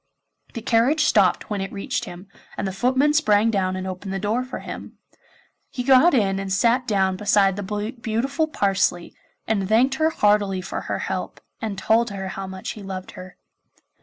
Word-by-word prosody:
The 230 - -5
carriage 250 +8 +3
stopped 205 -6 +2
when 205 -2 -1
it 195 - -4
reached 200 - -3
him, 180 +3 -10 0.3
and 200 - -2
the - - -2
footmen 260 +8 +2
sprang 225 -7 +3
down 185 -3 0
and 185 0 -4
opened 190 +1 -6
the 195 - -2
door 215 +6 -1
for 255 - -6
him. - - -9 0.7
He 250 - -4
got 270 +5 +5
in 195 -5 +1
and 195 -1 -5
sat 235 +6 +2
down 190 -3 +1
beside 200 -1 +3
the 205 +3 -4
beautiful 270 +8 -1
Parsley, 195 - 0 0.3
and 200 -3 -1
thanked 245 +5 +4
her 315 - +4
heartily 205 -8 +2
for - - -5
her - - -1
help, - - -4 0.2
and 215 -3 -3
told 225 +4 +2
her 190 -2 -5
how 195 0 -6
much 190 0 -6
he 215 - -9
loved 190 -1 -7
her. 185 -2 -11
205 Hz, 185 wpm, -23 LUFS, 195-235 Hz, 0.7 s, got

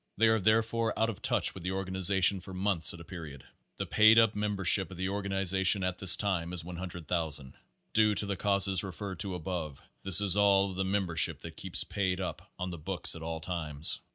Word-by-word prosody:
They 110 +2 +4
are 110 0 +2
therefore 110 +2 +1
out 110 +1 +1
of 100 - -12
touch - - 0
with 95 - -10
the 90 +2 -3
organization 95 0 +1
for 95 +1 -10
months 95 -3 +1
at 85 - -10
a - - -10
period. 80 -6 -10 0.3
The - - -3
paid 110 +1 +5
up 115 -1 +5
membership 100 -2 +2
of 90 - -11
the 95 +1 -2
organization 95 -1 +1
at 90 -1 -3
this 95 -2 +6
time 90 -4 -2
is 85 -2 -2
100,000. 85 -5 -5 0.4
Due 110 -1 +3
to 105 - +2
the 100 -1 -3
causes 100 -1 +2
referred 95 0 -7
to 95 -2 -3
above, 80 -5 -5 0.2
this 95 -1 +4
is 100 -2 +5
all 100 -1 +3
of - - -9
the 95 - -1
membership 95 -4 +1
that - - -9
keeps - - -2
paid 95 -2 -2
up 95 - -6
on 90 0 -4
the 85 - -8
books 90 +2 -1
at 80 - -9
all 80 0 -5
times. 80 -4 -1
95 Hz, 210 wpm, -30 LUFS, 85-100 Hz, 0.4 s, this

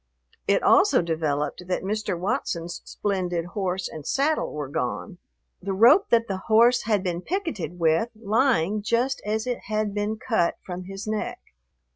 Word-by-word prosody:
It - - +3
also 380 - +5
developed 155 0 -2
that 180 - -1
Mr. 210 -2 -2
Watson's 175 -2 -2
splendid 180 -4 -2
horse 190 -1 -2
and 155 - -8
saddle 280 - 0
were 150 -2 -4
gone, 160 - -4 0.4
the 195 +1 -3
rope 240 - +6
that 230 -1 +3
the 190 -1 -3
horse 235 +2 +5
had 210 -4 +1
been 175 -2 -2
picketed 325 - -3
with 165 +6 +2
lying 215 -3 +1
just 240 +5 0
as 220 +1 -1
it 245 -1 -3
had 215 -1 -1
been 210 +1 -2
cut 215 -7 +1
from 180 0 -6
his 195 +1 -7
neck. 215 -1 -3
200 Hz, 155 wpm, -25 LUFS, 175-230 Hz, 0.4 s, rope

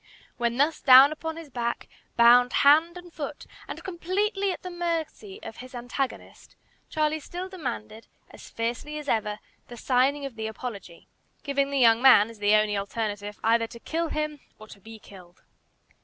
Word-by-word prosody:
While 235 0 -1
thus 295 +4 +1
down 265 +2 +8
upon 320 +1 -5
his 325 -4 -10
back, 235 -1 -3 0.3
bound 245 +1 +6
hand 320 +5 +5
and 355 -1 -12
foot, 290 -1 -7 0.2
and - - -8
completely 390 +3 -1
at - - -7
the 365 - -6
mercy 345 +4 -4
of 220 - -9
his 255 0 -11
antagonist, 245 +2 -6 0.3
Charlie 310 0 0
still 355 +5 -7
demanded, 235 - -7 0.2
as - - -13
fiercely 240 +6 -4
as 300 -1 -8
ever, 210 -3 -1 0.3
the 240 - -11
signing 265 +4 +1
of 270 -4 -7
the 220 0 -3
"apology," 210 -6 -8 0.4
giving 280 -1 0
the 280 - -2
young 230 -2 +5
man, 235 -5 +6
as 225 - -16
the 205 +1 +3
only 215 -1 +2
alternative, 205 0 -4
either 230 +1 +2
to 235 - -12
kill 330 +6 -3
him 305 -1 -3 0.2
or 215 - -13
to 200 - -13
be 225 +3 -12
killed. 180 -4 -16
255 Hz, 170 wpm, -26 LUFS, 225-315 Hz, 0.4 s, down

